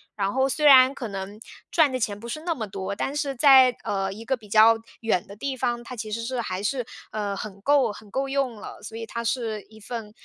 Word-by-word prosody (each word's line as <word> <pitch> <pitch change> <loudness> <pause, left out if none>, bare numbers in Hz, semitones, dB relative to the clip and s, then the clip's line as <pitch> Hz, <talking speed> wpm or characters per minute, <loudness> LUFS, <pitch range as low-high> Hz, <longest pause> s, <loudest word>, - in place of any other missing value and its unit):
然 200 -1 -1
后 265 0 +2
虽 300 +3 -1
然 265 -1 +8
可 245 - -5
能 200 +1 -6 0.3
赚 315 -5 +4
的 255 - -2
钱 205 -2 -2
不 235 - -9
是 305 +6 -5
那 335 0 -2
么 220 -6 -4
多， 195 0 -5
但 270 +7 -3
是 285 -2 -2
在， 260 -2 +7
呃， 195 -1 -1
一 220 +4 -9
个 265 - +1
比 215 -4 -17
较 220 +2 +7 0.3
远 215 -6 0
的 200 - -10
地 270 +5 -3
方， 240 -2 -2
它 250 - -8
其 215 -2 -6
实 230 +2 -3
是 245 +1 -2
还 185 -3 -4
是， 250 +4 -1 0.3
呃， 205 -2 -3
很 200 -1 -7
够 275 -1 +3
很 210 0 -13
够 270 +6 -2
用 270 -3 -1
了， 210 - -10
所 220 +1 -8
以 225 - -5
它 235 +1 -5
是 225 -2 -2
一 220 0 -15
份 220 -1 -7
230 Hz, 265 characters per minute, -25 LUFS, 210-265 Hz, 0.3 s, 然